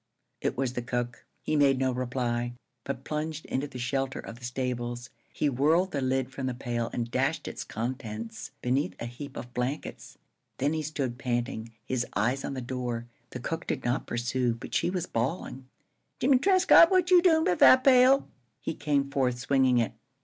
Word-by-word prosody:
It - - -1
was 130 -2 -1
the 125 - -2
cook. 120 0 -4 0.2
He 155 - 0
made 140 -2 +4
no 130 0 +1
reply, 120 -1 -2 0.3
but 135 -1 -4
plunged 155 +1 -3
into 135 +3 -2
the 130 - -9
shelter 135 +2 -1
of 115 - -8
the - - -16
stables. 120 -1 -3 0.2
He 150 - 0
whirled 155 +8 +2
the 140 - -2
lid 130 0 0
from 130 -1 -3
the 125 - -2
pail 120 -2 -2
and 120 -1 -3
dashed - - 0
its - - -5
contents 115 -1 -5
beneath 130 +4 0
a - - -4
heap 135 +4 -8
of 125 0 -8
blankets. 130 +5 -4 0.4
Then 145 +3 +1
he 160 - -1
stood 140 -5 -3
panting, 120 -3 -2
his 125 -2 -1
eyes 125 +6 +1
on 140 - -4
the 130 - -4
door. 120 -2 -3 0.2
The 125 - -7
cook 165 +7 -4
did - - -2
not 120 +1 0
pursue, 120 0 0
but 115 - -10
she - - +2
was 180 -1 -2
bawling: 130 -1 -3 0.5
"Jimmie 260 0 +4
Trescott, 370 -1 +7
what 370 -1 +2
you 360 -1 +8
doin' 325 -3 +4
with 180 - +1
that 260 0 +8
pail?" 260 +1 +6 0.3
He 145 - -3
came 145 -2 0
forth, 130 -3 +1
swinging 130 0 +3
it. 115 -3 +1
130 Hz, 185 wpm, -28 LUFS, 120-150 Hz, 0.5 s, you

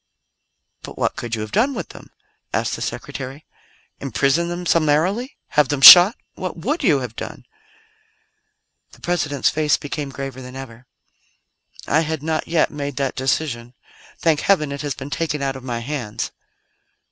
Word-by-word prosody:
"But - - -10
what - - -1
could 120 -1 -4
you 110 - -5
have 110 - -6
done 255 +6 +1
with - - -5
them?" - - -13 0.5
asked - - -1
the - - -9
Secretary. 135 +3 -6 0.5
"Imprison 140 - 0
them 175 +1 -5
summarily? 170 - +1
Have 150 -3 +2
them 145 -2 -1
shot? 180 - +11 0.2
What 185 -1 -6
would 280 - -2
you 145 -7 +3
have 120 -3 -6
done?" - - -8 1.5
The - - -17
President's 145 -5 0
face 155 -1 +1
became 145 0 -5
graver 135 -1 -7
than 125 0 -10
ever. 125 -2 -10 1.0
"I 150 - +2
had 160 -2 -3
not 160 0 -2
yet 165 -1 +1
made 145 -2 -5
that 135 -1 -1
decision. 125 -2 -2 0.4
Thank 160 -3 +1
Heaven, 155 -7 +2
it 140 - -5
has 145 -2 -3
been 140 +2 -8
taken 150 -3 -2
out 135 -1 -1
of 130 - -9
my 120 -2 -4
hands." 120 -5 -4
145 Hz, 160 wpm, -21 LUFS, 130-160 Hz, 1.5 s, shot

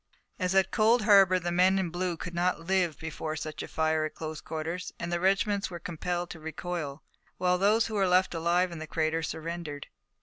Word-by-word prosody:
As 185 0 0
at 190 -1 +3
Cold 225 +1 +4
Harbor, 195 -3 +6
the 175 -1 -2
men 185 +2 +4
in 185 -3 -1
blue 175 -1 -2
could 180 +2 -6
not 175 -1 0
live 180 -4 +1
before 155 0 -5
such 155 0 -5
a - - -6
fire 160 0 +1
at 155 - -4
close 155 -1 -6
quarters, 165 +3 -4
and 170 +1 -4
the 175 - +1
regiments 195 +2 +1
were 175 - -6
compelled 175 +1 -3
to 165 - -8
recoil, 160 -2 -5 0.3
while 180 0 +2
those 215 +4 +4
who 220 - -5
were 195 -2 +2
left 180 +1 +3
alive 175 +2 +1
in 170 - -7
the 155 - -6
crater 160 +1 0
surrendered. 160 -2 -5
175 Hz, 205 wpm, -29 LUFS, 160-185 Hz, 0.3 s, Harbor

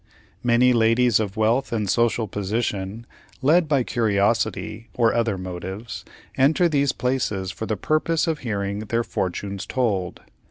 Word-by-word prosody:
Many 125 +1 +4
ladies 115 0 +3
of 105 -1 -3
wealth 115 +5 +1
and 110 -3 -1
social 115 +1 +1
position, 105 +1 -3 0.4
led 160 +4 +4
by 140 -4 +2
curiosity, 110 0 0
or 115 -2 +3
other 115 -4 0
motives, 95 +3 -6 0.3
enter 155 +6 +4
these 140 -3 +2
places 110 -7 -1
for 110 - -6
the 110 - -1
purpose 155 +1 +1
of 160 -3 -1
hearing 100 -4 -3
their 115 +2 -1
"fortunes 100 0 -3
told." 100 -8 -1
115 Hz, 135 wpm, -23 LUFS, 100-125 Hz, 0.4 s, Many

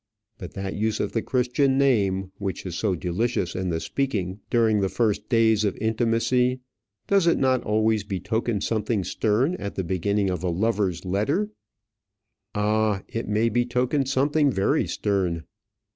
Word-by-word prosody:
But - - -9
that 95 0 -4
use 110 0 -1
of - - -1
the 115 - 0
Christian 130 +2 +1
name, 100 -9 +2
which 95 -1 -4
is 90 - -4
so 100 -2 0
delicious 90 +2 -1
in 95 0 -2
the 80 -1 -1
speaking 100 -6 -2
during 110 -3 +3
the 95 -1 +1
first 110 -2 0
days 110 -3 +3
of 100 -3 -1
intimacy, 115 +3 +1 0.5
does 195 -3 +3
it 170 - +4
not 130 -2 +2
always 110 0 +1
betoken 100 +3 -2
something 110 -2 0
stern 115 - +1
at 100 - -5
the 95 - -2
beginning 95 +3 0
of 90 -3 -3
a 90 - -1
lover's 95 -1 0
letter? 140 - 0 1.0
Ah, 105 -1 +1
it 115 - -4
may 110 +2 +2
betoken 125 +4 0
something 140 +2 +2
very 95 -4 +1
stern! 90 -5 -1
110 Hz, 155 wpm, -25 LUFS, 95-120 Hz, 1.0 s, it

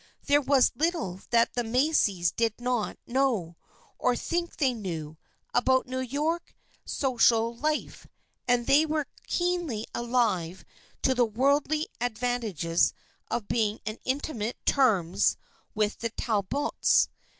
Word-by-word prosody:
There 290 +1 +4
was 270 -2 +4
little 295 - -1
that 235 -1 +3
the 245 - -1
Macys 225 - +2
did 230 -1 -1
not 245 -3 -1
know, 235 -10 0 0.4
or 250 - +2
think 340 +5 -3
they 265 -4 +2
knew, 160 -8 -6 0.3
about 260 +1 +3
New 255 0 -4
York 295 +7 -2 0.3
social 235 -3 +2
life, 305 +5 -2 0.4
and 245 -1 +2
they 285 +5 +5
were 310 -1 -1 0.2
keenly 350 -11 -1
alive 230 -8 0 0.4
to 265 - +4
the 250 -1 +3
worldly 280 +7 +1
ad 245 -3 -2
vantages 215 -10 0 0.4
of 215 -4 -2
being 220 -2 0
on 215 +1 -4
intimate 255 -4 -2
terms 200 - +3 0.4
with 210 -1 0
the 230 - -2
Tal 220 -2 -1
bots. 285 +10 +2
245 Hz, 130 wpm, -27 LUFS, 215-280 Hz, 0.4 s, they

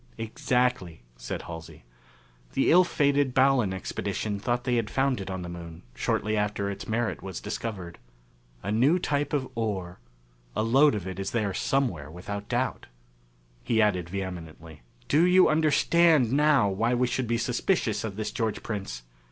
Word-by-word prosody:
"Exactly," 115 - -1
said - - -6
Halsey. 80 -5 -9 0.7
"The 135 - +2
ill 180 +3 +7
fated 140 -5 +1
Ballon 130 -6 +4
Expedition 100 +2 -3
thought 120 +3 -1
they 125 -1 +1
had 115 -2 -1
found 135 -4 0
it 95 - -6
on 95 -1 -4
the - - -6
Moon, 85 -1 -9
shortly 105 +11 -1
after 105 -1 -1
its 100 - -7
merit 110 +1 -1
was 95 -3 -6
discovered. 105 -5 -5 0.6
A 100 - -2
new 130 +11 +4
type 145 -5 -1
of 140 -3 -1
ore 95 - -3 0.6
a - - +1
lode 135 +4 +4
of 100 -4 -4
it 95 0 -6
is 95 - -2
there 105 -4 -1
somewhere, 95 - -1
without 100 +5 -7
doubt." 125 +1 -1 0.8
He 115 - +1
added 90 -6 +2
vehemently, 85 -5 -7 0.3
"Do 155 +3 +4
you 180 +1 +6
understand 155 -3 +4
now 145 -5 +4
why 115 +5 +1
we 125 +1 +2
should 125 0 -2
be 115 +1 +1
suspicious 120 - 0
of 105 -3 -4
this 105 0 -3
George 110 -3 -2
Prince? 100 - -5
110 Hz, 160 wpm, -27 LUFS, 95-130 Hz, 0.8 s, ill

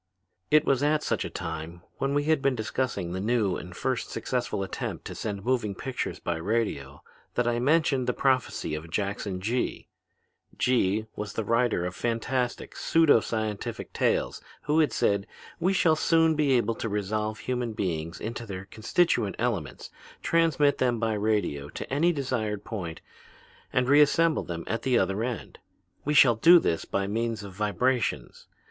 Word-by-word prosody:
"It 155 0 +5
was 135 -1 +2
at 150 +1 +2
such - - 0
a - - -4
time, 85 0 -6 0.2
when 140 +1 0
we 145 - +2
had 155 -1 +2
been 135 -2 +2
discussing 110 -5 -2
the 95 - -3
new 105 -4 +1
and 90 0 -8
first 130 -2 -2
successful 115 -3 -2
attempt 95 - -5
to - - -6
send 100 -2 -5
moving 120 -6 0
pictures 130 +6 -4
by 85 -1 -3
radio, 80 -8 -2 0.3
that 120 -1 +1
I 120 0 +1
mentioned 140 -1 +2
the - - +3
prophecy 130 - 0
of 75 +2 -5
Jackson 100 0 -2
Gee. 120 +6 -2 0.7
Gee 110 -4 +2
was 105 -1 -5
the 110 - -2
writer 115 -4 +1
of 90 - -3
fantastic, 120 +2 -2
pseudo 165 -7 +4
scientific 110 -2 -4
tales - - 0 0.2
who 150 +2 +2
had 150 -6 +3
said: 100 -3 +1 0.3
'We 185 +3 +2
shall 165 -4 +4
soon 165 0 +3
be 150 -3 +2
able 115 -2 +2
to 115 - -4
resolve 105 +1 -2
human 120 0 -3
beings 85 -5 -3
into 115 +1 -5
their 95 -1 -6
constituent 110 - +1
elements, 115 - -3 0.3
transmit 160 -4 +3
them 125 -2 +2
by 110 -1 0
radio 105 -9 -1
to - - -7
any 165 +5 +3
desired 115 - -2
point 90 -7 -6 0.7
and 125 0 +1
reassemble 150 +3 +4
them 85 -1 -5
at 115 0 -2
the 125 -1 +2
other 95 +2 +1
end. 120 -2 -5 0.4
We 150 +1 0
shall 130 -4 +7
do 170 +9 +8
this 85 - 0
by 100 0 -1
means 115 +1 -2
of 100 -2 -9
vibrations. 105 +2 -1
115 Hz, 165 wpm, -27 LUFS, 100-130 Hz, 0.7 s, do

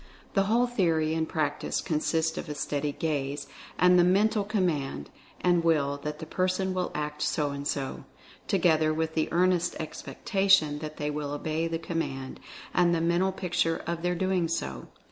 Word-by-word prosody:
The 195 -1 +3
whole 235 +4 +3
theory 165 -10 +1
and 160 0 -1
practice 150 -2 -1
con 155 -4 -1
sists 160 +1 0
of 175 - -5
a 150 - -4
steady 145 0 -2
gaze, 145 -2 -2 0.3
and 180 0 +6
the - - +6
Mental 205 +4 +3
command, 160 - -1 0.3
and 175 -2 +3
will, 145 -4 +2
that 150 0 -4
the 160 - -7
person 185 +2 0
will 185 -1 -1
act 150 0 -3
so 150 -2 0
and 140 0 -4
so, 135 -2 -3 0.4
together 155 -2 +3
with 160 0 -1
the 160 -1 0
earnest 175 0 +2
expectation 155 - +1
that 155 0 -7
they 150 -1 -2
will 145 -1 -3
obey 155 +2 -1
the 165 0 -2
com 165 0 -3
mand, 135 -4 -4 0.3
and 175 -1 +4
the - - +1
mental 170 +3 +2
picture 175 -3 -1
of 170 0 -3
their 180 0 0
doing 185 -1 +1
so. 65 - -3
165 Hz, 180 wpm, -28 LUFS, 150-180 Hz, 0.4 s, and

